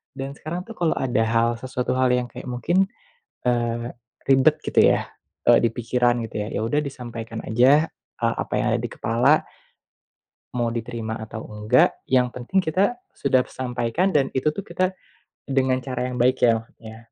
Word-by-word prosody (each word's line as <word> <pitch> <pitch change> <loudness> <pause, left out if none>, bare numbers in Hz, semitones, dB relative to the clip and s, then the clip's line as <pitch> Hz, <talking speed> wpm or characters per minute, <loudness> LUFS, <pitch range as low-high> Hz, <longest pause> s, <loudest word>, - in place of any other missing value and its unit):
Dan 135 0 -5
sekarang 175 +4 -5
tuh 230 - -8
kalo 170 -2 +2
ada 125 -3 +1
hal 115 +1 +2
sesuatu 125 -1 -2
hal 130 0 +2
yang 125 -1 0
kayak - - -9
mungkin, 175 +10 +1 0.6
eee, 120 0 0 0.4
ribet 135 +3 +5
gitu - - +3
ya, - - +3 0.4
eee, - - +8
dipikiran 120 +1 +1
gitu 105 -1 -4
ya - - -5
yaudah 115 +7 +1
disampaikan 115 -4 -6
aja 135 +8 +4 0.3
apa - - -1
yang - - +1
ada - - +2
di - - -3
kepala, 125 +7 +2 1.1
mau 120 -1 0
diterima 115 -1 -4
atau 110 0 -7
engga 105 +4 +3 0.2
yang 125 -1 +3
penting 155 +12 -1
kita 190 +9 +1 0.2
sudah 130 -2 +2
sampaikan 125 +9 -1
dan 135 -2 +3
itu 150 +3 0
tuh 200 - -4
kita 185 +1 -1 0.5
dengan 130 -1 +1
cara 125 -1 -3
yang 125 - -4
baik 125 +1 +2
ya 120 - +7
maksudnya. 110 0 -13
125 Hz, 160 wpm, -23 LUFS, 115-140 Hz, 1.1 s, eee